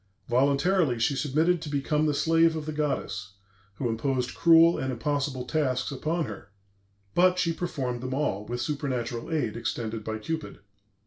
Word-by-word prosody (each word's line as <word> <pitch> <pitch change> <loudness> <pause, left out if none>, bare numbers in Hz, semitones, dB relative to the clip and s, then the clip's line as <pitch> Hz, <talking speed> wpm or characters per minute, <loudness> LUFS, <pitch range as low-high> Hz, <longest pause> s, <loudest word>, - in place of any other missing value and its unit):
Voluntarily 140 +3 +2
she 120 +5 +1
submitted 155 +6 +1
to 160 - -6
become 150 +2 +1
the 150 - +1
slave 165 +1 +3
of 155 -1 -4
the 155 - -3
goddess, 105 -10 -2 0.4
who 125 - -2
imposed 125 +2 -1
cruel 165 0 +6
and 130 0 -2
impossible 135 0 -2
tasks 130 -2 0
upon 155 +5 -1
her, 105 -3 -9 0.6
but 180 +1 +4
she 170 -2 +1
performed 130 -8 -3
them 130 0 -3
all, 135 -9 -1
with 120 +3 -4
supernatural 125 -3 -3
aid 140 -9 -1
extended 115 -1 -3
by 110 0 -3
Cupid. 160 +9 -5
140 Hz, 155 wpm, -27 LUFS, 120-160 Hz, 0.6 s, cruel